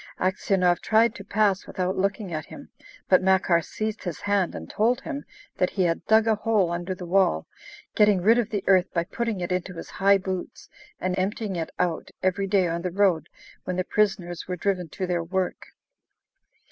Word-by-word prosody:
Aksionov 185 -1 +1
tried 225 +1 +3
to 200 - -9
pass 200 -1 +1
without 185 0 -2
looking 195 -1 -1
at 155 -1 -4
him, - - -11 0.4
but 185 - +5
Makar 185 -2 +3
seized 215 +6 -4
his 175 -4 -5
hand 200 -3 0
and 80 0 -7
told 235 - +1
him 285 -2 -6 0.3
that 180 - +2
he 190 - 0
had 165 -1 0
dug 220 0 +5
a 225 - +3
hole 210 -4 +1
under 175 +2 -3
the 180 - -8
wall, 175 - +2 0.5
getting 210 -2 +4
rid 225 +6 +4
of 230 -2 -1
the 205 -4 -2
earth 185 -1 +4
by 170 - +2
putting 220 +2 -3
it 175 - -3
into 180 0 -2
his 165 - -8
high 200 +1 +4
boots, 185 -1 -6 0.3
and 185 0 -1
emptying 200 +1 -2
it 165 -2 -3
out 175 -2 -1
every 190 +1 +1
day 190 -2 +3
on 170 0 -2
the 180 - -2
road 185 -3 +1 0.3
when 185 - -3
the 185 - 0
prisoners 190 -4 -1
were 180 - -2
driven 180 -2 -1
to 185 - -4
their 175 -2 -1
work. 185 +2 -2
190 Hz, 195 wpm, -25 LUFS, 175-205 Hz, 0.5 s, but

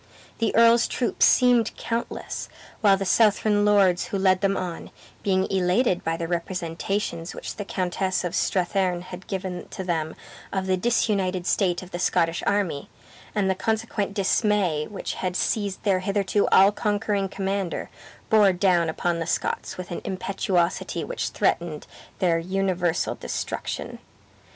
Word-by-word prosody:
The 225 -2 0
earl's 230 +1 +6
troops 245 - +2
seemed 245 -3 +3
countless, 230 0 -4 0.3
while 200 -3 +5
the 195 - -3
Southron 205 +1 +3
lords 195 -4 +3
who 200 - -2
led 190 -1 +3
them 195 -1 +1
on, 175 -2 -5 0.3
being 190 -1 +1
elated 185 +2 +2
by 165 0 -1
the 165 - -3
representations 175 +1 -3
which - - -7
the 205 - -4
Countess 185 0 -1
of 175 -1 -3
Strathearn 180 -1 0
had 185 +1 -10
given 185 -2 -4
to 190 - -6
them 160 -3 -2 0.4
of 190 -1 -1
the 190 0 +2
disunited 190 -3 0
state 180 -2 +1
of 185 - -13
the 175 - -4
Scottish 170 -2 +1
army, 195 -8 0 0.5
and 205 -2 +1
the 190 - +3
consequent 210 -1 -2
dismay 195 -6 +1
which 205 - -5
had 180 -1 -2
seized 200 0 -1
their 195 -3 +2
hitherto 200 +1 +1
all 195 +1 +6
conquering 205 -2 -1
commander, 195 -2 -3 0.4
bore 210 -3 +6
down 175 -3 +2
upon 170 +1 -1
the 165 - -3
Scots - - -2
with 185 -1 -7
an 175 - -4
impetuosity 185 -2 -1
which - - -3
threatened - - -1 0.3
their 170 -3 +2
universal 185 -1 0
destruction. - - -5
190 Hz, 145 wpm, -25 LUFS, 180-205 Hz, 0.5 s, earl's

